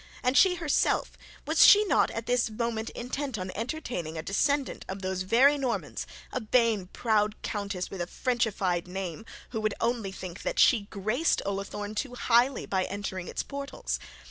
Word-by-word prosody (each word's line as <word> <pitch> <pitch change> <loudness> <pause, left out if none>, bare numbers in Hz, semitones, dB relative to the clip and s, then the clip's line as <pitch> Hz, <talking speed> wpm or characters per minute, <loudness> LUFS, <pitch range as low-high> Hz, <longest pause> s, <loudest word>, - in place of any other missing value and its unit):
And 250 +1 +2
she 370 +2 +6
herself, 330 -4 +1 0.3
was - - +8
not - - +3
she - - -9
at 230 - -3
this 245 -1 +1
moment 225 0 -2
intent 260 0 -4
on 185 -1 -4
entertaining 225 - -4
a 160 - -4
descendant 280 +7 0
of 190 +1 -5
those 185 0 -2
very 260 +10 +4
Normand, 255 -3 -2 0.3
a - - 0
vain 225 -4 +2
proud 215 0 0
countess 200 -3 -3
with 190 - -5
a 175 - -2
frenchified 200 -8 0
name, 185 +1 -5 0.2
who 220 -3 -2
would 215 -1 0
only 230 -4 -1
think 185 -1 -8
that - - -3
she 220 - +5
graced 215 - 0
Ullathorne 200 +1 -4
too 245 +3 -3
highly 245 +2 +3
by 190 -1 0
entering 190 -2 -5
its - - -3
portals? 280 0 -4
220 Hz, 170 wpm, -28 LUFS, 195-250 Hz, 0.3 s, was